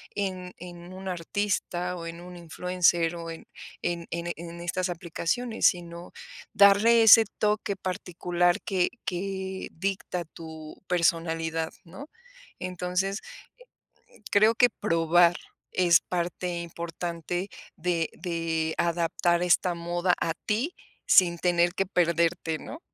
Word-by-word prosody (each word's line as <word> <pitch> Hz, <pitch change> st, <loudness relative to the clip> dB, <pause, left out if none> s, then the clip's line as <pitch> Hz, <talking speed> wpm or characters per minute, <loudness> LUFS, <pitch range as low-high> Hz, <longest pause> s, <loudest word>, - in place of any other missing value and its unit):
en 185 Hz, -2 st, -3 dB
en 175 Hz, 0 st, -10 dB
un 190 Hz, +1 st, -8 dB
artista, 180 Hz, 0 st, -2 dB
o 170 Hz, -2 st, -7 dB
en 165 Hz, +1 st, -8 dB
un 180 Hz, 0 st, -10 dB
influencer, 175 Hz, 0 st, +1 dB
o 165 Hz, -1 st, -6 dB
en 165 Hz, -, -10 dB, 0.3 s
en 170 Hz, -1 st, -3 dB
en 170 Hz, +1 st, -3 dB
en 170 Hz, +1 st, -8 dB
estas 180 Hz, +2 st, -2 dB
aplicaciones, 175 Hz, +7 st, 0 dB
sino 170 Hz, -2 st, -3 dB, 0.4 s
darle 210 Hz, +4 st, +6 dB
ese 225 Hz, +1 st, +9 dB
toque 210 Hz, -1 st, 0 dB
particular 175 Hz, -1 st, -1 dB
que 185 Hz, -2 st, +1 dB, 0.2 s
que 190 Hz, +1 st, -4 dB
dicta 185 Hz, -1 st, -3 dB
tu 160 Hz, -1 st, -11 dB
personalidad, 165 Hz, -2 st, 0 dB
¿no? 275 Hz, -, -11 dB, 0.5 s
Entonces 185 Hz, +2 st, -2 dB, 1.1 s
creo 215 Hz, +3 st, +5 dB
que 245 Hz, +2 st, +5 dB
probar 170 Hz, -1 st, +3 dB, 0.4 s
es 175 Hz, -2 st, +5 dB
parte 175 Hz, 0 st, -3 dB
importante 170 Hz, +2 st, -4 dB, 0.3 s
de 170 Hz, -1 st, 0 dB
de 165 Hz, -2 st, -2 dB
adaptar 170 Hz, 0 st, +1 dB
esta 180 Hz, 0 st, +3 dB
moda 175 Hz, +1 st, 0 dB
a 165 Hz, -, 0 dB
ti, 235 Hz, +11 st, 0 dB, 0.3 s
sin 170 Hz, -3 st, +6 dB
tener 175 Hz, 0 st, +2 dB
que 195 Hz, 0 st, 0 dB
perderte, 170 Hz, -2 st, +1 dB
¿no? 305 Hz, -, -9 dB
175 Hz, 120 wpm, -27 LUFS, 170-185 Hz, 1.1 s, ese